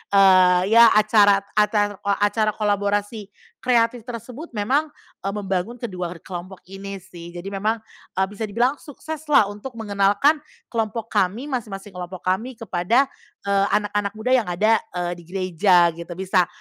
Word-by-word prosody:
eee, 185 -2 +6
ya 230 0 +8
acara, 210 -2 +5
acar 210 -1 +1
o - - -11
acara 210 +1 +1
kolaborasi 205 0 -1 0.3
kreatif 235 -2 +1
tersebut 245 +6 -7
memang 265 +10 +1 0.3
e - - -6
membangun 195 +2 -2
kedua 185 -7 -5
kelompok 185 +1 -8
ini 195 +1 -7
sih. 170 -1 -11
Jadi 180 +3 -6
memang, 215 +3 -1 0.3
e 190 - 0
bisa 210 +2 -4
dibilang 245 +7 +1
sukses 310 +1 -8
lah 295 -7 +6
untuk 210 +5 -8
mengenalkan 205 +7 +2 0.3
kelompok 225 0 -2
kami, 210 +8 0
masing-masing 210 -5 -5
kelompok 180 0 -8
kami 240 +7 -3
kepada, 230 +6 +1 0.3
eee, 200 0 +2
anak-anak 205 -1 -1
muda 220 +4 -2
yang 250 -6 +3
ada, 215 +5 +3 0.2
eee, 175 0 -2
di 175 - -13
gereja 180 -1 +3
gitu. 170 +1 -9
Bisa 185 -1 +1
205 Hz, 150 wpm, -22 LUFS, 190-230 Hz, 0.3 s, ya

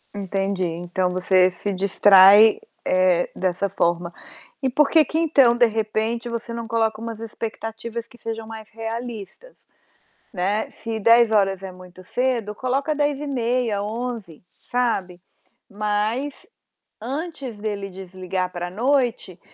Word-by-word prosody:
Entendi. 195 -1 -2
Então 175 +2 -2
você 185 0 +3
se 200 +2 -4
distrai, 200 +2 +7 0.3
eh, 185 -1 +2
dessa 185 +2 -1
forma. 175 -2 -1 0.5
E 265 - +1
por 275 +3 +3
que 320 -2 +6
que 315 - -3
então, 275 -7 +4
de 240 - +5
repente, 220 +2 -2
você 235 0 -5
não 230 -1 -5
coloca 225 -2 0
umas 230 -1 -6
expectativas 225 +1 -6
que 240 - -18
sejam 225 -1 -5
mais 220 -1 -9
realistas? 225 - -7 0.8
Né, 200 +2 -1
se 225 -1 -5
22h 215 -4 +4
é 190 -1 -7
muito 185 0 -14
cedo, 240 -1 -1
coloca 270 +6 -1
22h30, 255 -7 -1
23h, 220 -6 -5
sabe. 200 -5 -2 0.5
Mas 215 +7 -2 0.5
antes 275 -1 -5
dele 205 -2 -4
desligar 185 0 -4
pra 175 0 -4
noite, 235 -4 0
220 Hz, 125 wpm, -22 LUFS, 190-240 Hz, 0.8 s, distrai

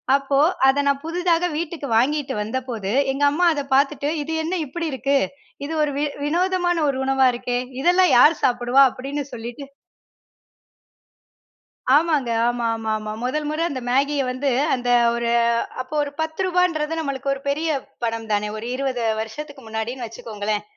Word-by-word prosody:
அப்போ 275 0 +1 0.3
அத 275 +2 +4
நான் 280 0 +1
புதிதாக 345 +1 +1
வீட்டுக்கு 320 -3 -4
வாங்கிட்டு 275 +2 +1
வந்தபோது, 225 -2 -3 0.2
எங்க 275 +2 -2
அம்மா 355 +4 +1
அத 290 - -2
பாத்துட்டு, 285 +1 +1
இது 320 +3 -4
என்ன 335 +3 -3
இப்படி 335 +5 -4
இருக்கு? 275 +2 +1 0.5
இது 320 - -4
ஒரு 300 - +1
வி 290 - +1 0.2
வினோதமான 350 +2 +1
ஒரு 270 - -1
உணவா 265 -1 +3
இருக்கே, 245 0 -2 0.2
இதெல்லாம் 360 +3 +4
யார் 300 +7 +7
சாப்பிடுவா? 245 +2 +4
அப்படின்னு 275 +3 -4
சொல்லிட்டு. 240 +3 -7 2.3
ஆமாங்க. 300 -5 +2 0.2
ஆமாமாமா. 225 -3 -2
முதல் 300 +4 -1
முறை 310 +2 -2
அந்த 265 -3 -4
மேகிய 280 +2 +2
வந்து 265 +2 -1 0.2
அந்த 245 -1 -2 0.2
ஒரு 235 0 -1 0.5
அப்போ 255 +4 -6
ஒரு 285 - -6
ரூ.10ன்றது 325 -1 0
நம்பளுக்கு 275 -2 -2
ஒரு 270 - -10
பெரிய 310 +3 0 0.3
பணம் 225 -1 -3
தானே. 210 0 0
ஒரு 220 - -6
20 260 -3 -2 0.2
வருஷத்துக்கு 280 +4 -8
முன்னாடின்னு 230 +3 -4
வச்சுக்கோங்களேன். 215 -2 -4
275 Hz, 140 wpm, -22 LUFS, 245-305 Hz, 2.3 s, யார்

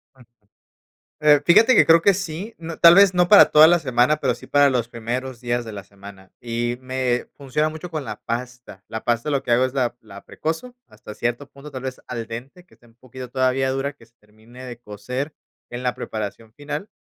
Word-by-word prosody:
Ujú. 130 -2 -19 1.0
Eh, 150 -1 +5
fíjate 225 +8 +6
que - - +6
creo 165 0 +6
que 200 - +4
sí, 185 +3 -6
n 165 -1 -8
tal 170 0 +8
vez 195 -1 +6
no 180 -1 +3
para 205 - +9
toda 155 +1 +7
la 175 0 +4
semana, 130 +1 +2
pero 130 -5 -1
sí - - -14
para 145 -1 +4
los 120 -3 -1
primeros 120 +2 -5
días 120 0 -2
de 110 - -7
la 100 -2 -8
semana 100 0 -15
y 120 0 -3
me 130 -1 -2
funciona 145 +2 -1
mucho 160 +3 -8
con 155 -3 -4
la 120 - -8
pasta. 120 -4 -7
La 110 - -6
pasta, 120 +5 -1
lo 140 -2 0
que - - -4
hago 125 +2 +4
es 130 - -5
la 125 -3 -1
la 100 -2 -13
precozo 165 +11 -5
hasta 105 - -12
cierto 120 +4 -3
punto, 140 +2 -13
tal 130 -1 -7
vez 130 -1 -6
al 115 -2 -5
dente, 130 +10 -9
que - - -26
esté 120 - -26
un 115 - -25
poquito 130 0 -11
todavía 130 0 0
dura, 135 +2 -3
que 115 -5 -20
se 115 - -33
termine 110 +4 -15
de 120 -2 -9
cocer 125 +7 -6 0.4
en 120 +1 -6
la 125 -1 -1
preparación 110 +1 -7
final, 150 - -6
130 Hz, 220 wpm, -22 LUFS, 120-150 Hz, 1.0 s, para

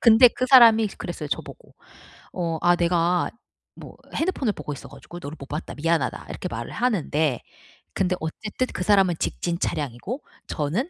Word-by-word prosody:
근데 235 +1 +8
그 255 - -2
사람이 230 -4 +7
그랬어요 165 -4 -5
저보고. - - -6 0.6
어 170 -3 -2
'아 175 0 +5
내가 175 0 +2 0.5
뭐 - - -12 0.2
핸드폰을 300 - 0
보고 - - -6
있어 - - -10
가지고 175 - -11
너를 145 +2 -7
못 140 - -9
봤다. 150 +4 -5
미안하다.' 155 -4 -1
이렇게 - - -5
말을 115 0 -5
하는데. 160 - 0 0.5
근데 185 -1 +1
어쨌든 210 +10 -3
그 - - -3
사람은 195 -2 +4
직진 170 0 -2
차량이고 150 - -3 0.2
저는 170 - -2
175 Hz, 345 characters per minute, -24 LUFS, 155-220 Hz, 0.6 s, 근데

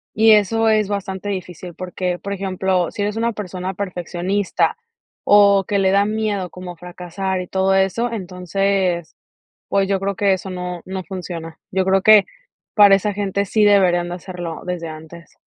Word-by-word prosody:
y 220 +1 +6
eso 225 +2 +4
es 215 -2 +2
bastante 200 0 -4
difícil 180 -3 -6
porque, 180 -1 -3
por 200 - -5
ejemplo, 190 -2 -1
si 205 - -5
eres 210 +2 -2
una 235 +1 0
persona 185 -2 -5
perfeccionista, 185 +1 -1 0.5
o, 200 -1 +6
que 200 -1 +1
le 190 -1 +3
da 200 +1 +3
miedo 210 -3 -2
como 180 0 -9
fracasar 180 +2 -4
y 180 - -7
todo 190 +1 +1
eso, 195 +5 +1
entonces, 185 -2 -1 0.5
pues, 195 -1 +1
yo 195 -1 +1
creo 195 0 -2
que 195 -1 +3
eso 190 +1 -6
no 180 -1 -5
no 190 0 -5
funciona. 170 -4 -7
Yo 190 0 0
creo 190 0 +3
que 215 -1 +7 0.5
para 205 -2 +7
esa 205 +1 -2
gente 200 0 -1
sí 215 +2 +2
deberían 185 -4 +4
de 175 - -4
hacerlo 175 -3 -7
desde 175 -2 -4
antes. 160 +2 -11
190 Hz, 170 wpm, -20 LUFS, 180-200 Hz, 0.5 s, que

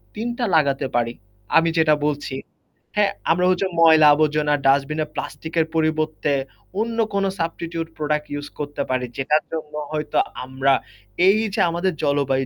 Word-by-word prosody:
৩ 220 +3 -3
টা 245 - 0
লাগাতে 140 -3 +2
পারি। 120 -1 +1 0.4
আমি 165 0 +4
যেটা 160 -1 +4
বলছি, 145 -2 -2 0.6
হ্যাঁ? 205 -1 +3 0.2
আমরা 180 +2 +2
হচ্ছে 185 +1 +1
ময়লা 160 -2 +7
আবর্জনা, 150 0 +2
ডাস্টবিনের 145 +3 +1
প্লাস্টিকের 160 0 -2
পরিবর্তে 155 -2 0 0.5
অন্য 230 +1 -2 0.2
কোন 200 0 +1 0.2
সাবস্টিটিউট 165 0 -3
প্রোডাক্ট 150 0 -1
ইউস 145 0 -5
করতে 145 0 -4
পারি। 130 -1 0
যেটার 150 +3 +1
জন্য 155 -2 -5 0.2
হয়তো 150 -1 -2 0.3
আমরা 130 +1 +1 0.5
এই 195 +2 +6 0.2
যে 215 - +1
আমাদের 175 +2 -1
জলবায়ু 140 -2 +1
155 Hz, 145 wpm, -22 LUFS, 145-165 Hz, 0.6 s, ময়লা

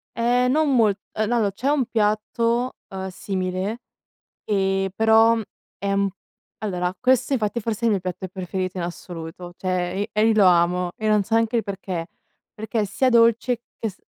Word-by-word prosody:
Ehm, 245 +2 +2
non 300 -1 +2
molt 215 -5 +3 0.2
ehm, 215 0 0
no 240 - +2
allora 210 -4 +2
c'è 230 +7 -4
un 285 -4 +2
piatto, 230 +2 0
ehm, 190 0 -5
simile, 185 +3 -3 0.7
ehm, 195 -1 +1
però 225 +1 +5 0.4
è 200 0 -1
un 200 0 +2
p - - -30 0.5
allora 180 -3 -1
questo 255 +1 +2
infatti 230 -3 0
è - - -6
forse 230 +1 -1
il - - +4
mio 200 - +1
piatto 185 +1 -5
preferito 185 0 -4
in 180 - -2
assoluto, 175 0 -7
cioè 185 0 -2
i 205 - -2
e 215 +1 +3
io 225 - +4
lo 210 -2 +5
amo 175 0 +3
e 220 -2 -2
non 210 -1 +4
so 225 +3 -2
anche 225 +1 +2
il 230 - +2
perché: 190 -4 -4 0.5
perché 220 +1 -3
è - - +1
sia 255 +6 +1
dolce 235 0 +3 0.2
che 225 - -2
s 200 - -12
210 Hz, 190 wpm, -23 LUFS, 185-230 Hz, 0.7 s, però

